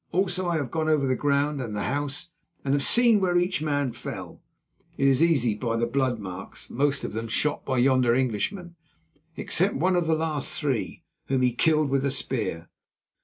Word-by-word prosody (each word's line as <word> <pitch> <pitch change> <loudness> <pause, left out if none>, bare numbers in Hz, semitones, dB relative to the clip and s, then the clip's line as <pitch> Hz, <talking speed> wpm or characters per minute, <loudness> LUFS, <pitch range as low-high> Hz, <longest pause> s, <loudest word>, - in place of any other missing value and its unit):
"Also 185 0 0
I 170 - 0
have 140 -6 -3
gone 160 -1 -1
over 150 -3 +2
the 130 -1 +1
ground 145 +1 0
and 110 -4 -5
the 105 - -2
house, 145 +4 -3 0.3
and 135 - +1
have 145 - +2
seen 235 - +4
where 180 -2 +2
each 175 -2 0
man 145 -4 0
fell—it 135 +3 -7
is 135 +1 +3
easy 140 -9 +3
by 115 +1 -2
the 120 - +1
blood 130 0 0
marks—most 110 +8 -3
of - - -4
them 115 +1 -4
shot 145 +6 0
by 130 - -1
yonder 125 -1 +3
Englishman, 130 - -2 0.6
except - - +1
one 185 +2 +2
of 175 -2 +1
the 160 - +3
last 155 -3 -1
three, 135 -7 -2 0.2
whom 130 -1 +1
he 125 -1 +2
killed 155 +2 +2
with 135 -1 +1
a 140 - +1
spear. 115 -11 -3
140 Hz, 185 wpm, -26 LUFS, 125-160 Hz, 0.6 s, seen